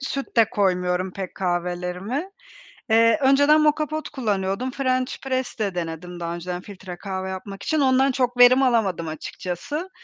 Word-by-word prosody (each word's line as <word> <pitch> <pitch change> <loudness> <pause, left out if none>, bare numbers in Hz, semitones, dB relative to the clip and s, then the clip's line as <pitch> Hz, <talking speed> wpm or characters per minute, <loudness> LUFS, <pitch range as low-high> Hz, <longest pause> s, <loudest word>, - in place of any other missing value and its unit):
süt 275 -1 -5
de 225 -1 +5
koymuyorum 180 -2 0
pek 190 -2 -6
kahvelerime. 180 - -2 0.6
Eee, 230 +5 +5
önceden 285 +3 +5
moka 305 0 +2
pot 310 +1 -4
kullanıyordum. 215 -2 -1
French 255 -1 -1
press 260 -2 -2
de 200 -4 -1
denedim 175 +1 -5
daha 170 0 -3
önceden 175 +1 -5
filtre 185 -3 -9
kahve 190 0 -5
yapmak 195 +1 -7
için. 315 -2 0
Ondan 265 0 +3
çok 250 -1 -1
verim 250 +2 +7
alamadım 200 -10 +1
açıkçası. 185 - -5
210 Hz, 150 wpm, -23 LUFS, 180-265 Hz, 0.6 s, verim